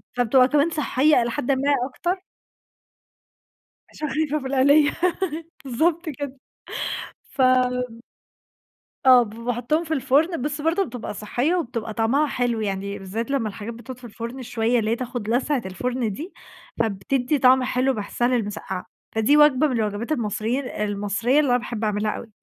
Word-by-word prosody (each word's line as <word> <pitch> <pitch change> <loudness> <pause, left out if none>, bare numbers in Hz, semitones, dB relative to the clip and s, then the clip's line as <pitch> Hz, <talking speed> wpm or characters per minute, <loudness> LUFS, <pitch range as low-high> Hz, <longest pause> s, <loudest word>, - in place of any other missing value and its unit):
فبتبقى 250 +1 +4
كمان 295 +3 +3
صحّية 295 -3 +3
إلى 235 0 -1
حدٍ 250 - -1
ما 275 +2 +1 0.2
أكتر. 360 +7 -3 1.7
عشان 305 -2 -5
خايفة 305 0 0
من 265 0 -5
القليّة 285 +3 +5 0.7
بالضبط 320 +6 0
كده 280 -2 -6 0.9
فم 250 -2 +2 1.1
آه 250 -2 +8
ب 215 -1 -9
فباحطّهم 245 +7 -1
في 320 -1 -3
الفُرن 295 +3 +2
بس 295 +1 -3
برضه 330 +5 +2
بتبقى 240 -3 -6
صحّية 245 - -1
وبتبقى 230 -9 -3
طعمها 255 +7 +2
حلو، 245 -4 -1
يعني 200 0 -3
بالذات 225 +7 -4
لمّا 235 -6 0
الحاجات 215 +3 -7
بتقعُد 245 +2 -9
في 255 - -19
الفُرن 235 +3 -7
شوية 235 0 +1
اللي 215 0 0
هي - - +2
تاخد 240 -3 -5
لسعة 255 +2 +1
الفُرن 240 +4 -2
دي، 315 - -7 0.5
فبتدّي 245 +7 0
طعم 260 0 +5
حلو 255 +1 +1
باحسّها 230 +3 -1
للمسقعة، 205 -6 -2 0.3
فدي 260 +7 +4
وجبة 295 -1 +5
من 260 - -2
الوجبات 215 +5 -2
المصري 225 0 -1
ال 275 - -6
المصرية 210 +6 0
اللي 290 -4 +2
أنا 245 - +4
باحب 235 -2 -5
اعملها 210 0 0
أوي. - - -7
250 Hz, 155 wpm, -23 LUFS, 225-285 Hz, 1.7 s, آه